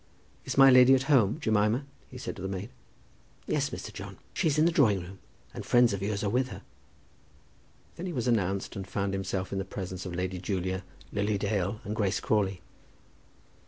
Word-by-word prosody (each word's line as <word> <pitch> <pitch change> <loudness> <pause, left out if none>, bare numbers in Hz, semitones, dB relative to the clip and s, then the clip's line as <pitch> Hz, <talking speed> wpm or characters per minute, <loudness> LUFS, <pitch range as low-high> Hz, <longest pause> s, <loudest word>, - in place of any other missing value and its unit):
"Is - - -4
my 135 -1 +9
lady 130 +1 +8
at 130 - 0
home, 110 -2 +4
Jemima?" 110 +1 +1 0.2
he 130 - -10
said 125 - -5
to - - -9
the 95 - -3
maid. 95 +4 -5 0.7
"Yes, - - 0
Mr. - - -7
John; - - -8 0.2
she - - +1
is 150 -1 +1
in 155 - +5
the 170 - +4
drawing 115 - +4
room, 90 +2 -10 0.3
and - - -6
friends 120 -3 +4
of 100 - -3
yours 100 +1 -2
are 105 - +1
with 125 +2 +1
her." 95 -6 -9 1.3
Then 180 - -5
he - - -3
was 125 -6 -2
announced, 100 -5 0
and 95 -2 -5
found 100 0 -2
himself 95 -1 -3
in 95 - -1
the - - -1
presence 95 -2 -6
of 85 - -5
Lady 90 +1 -2
Julia, 95 0 -2 0.3
Lily 100 0 0
Dale, 100 0 -1
and 105 +2 -4
Grace 100 -3 0
Crawley. 100 -4 0
100 Hz, 200 wpm, -29 LUFS, 95-120 Hz, 1.3 s, my